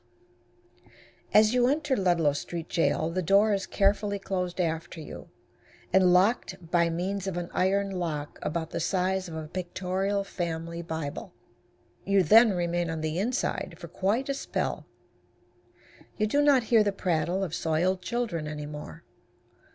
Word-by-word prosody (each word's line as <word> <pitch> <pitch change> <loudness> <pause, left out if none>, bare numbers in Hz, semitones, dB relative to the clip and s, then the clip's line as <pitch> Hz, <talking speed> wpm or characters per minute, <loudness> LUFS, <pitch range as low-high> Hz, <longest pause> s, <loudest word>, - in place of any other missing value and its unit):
As 215 +2 +5
you 245 -1 +4
enter 290 0 +1
Ludlow 175 - +2
Street 165 +3 -5
Jail 165 -1 +1
the 185 +2 -1
door 200 +5 +4
is 195 -1 -2
carefully 200 0 +1
closed 185 -2 -3
after 165 -1 -2
you, 155 - -9 0.6
and 185 -1 +5
locked 180 -3 +1
by 170 -1 +3
means 190 +3 -2
of 185 -2 -3
an 175 0 -4
iron 195 +2 +1
lock 160 -6 -4
about 160 +1 -3
the - - -3
size 185 +1 0
of 160 - -7
a 160 -1 -5
pictorial 185 +3 -2
family 170 -3 -4
Bible. 160 -4 -5 0.7
You 195 -1 +3
then 220 +5 +7
remain 175 -1 -1
on 160 -1 -3
the 155 +2 -2
inside 240 +6 -2
for - - -10
quite 215 +8 0
a 275 - 0
spell. 275 - -3 1.3
You 215 - +2
do 285 +7 +2
not 285 -4 +5
hear 220 -2 +7
the 205 - +1
prattle 180 -1 -1
of 170 -4 -4
soiled 175 +4 0
children 180 -5 -2
any 150 -1 -5
more. 150 - -9
180 Hz, 150 wpm, -28 LUFS, 165-200 Hz, 1.3 s, then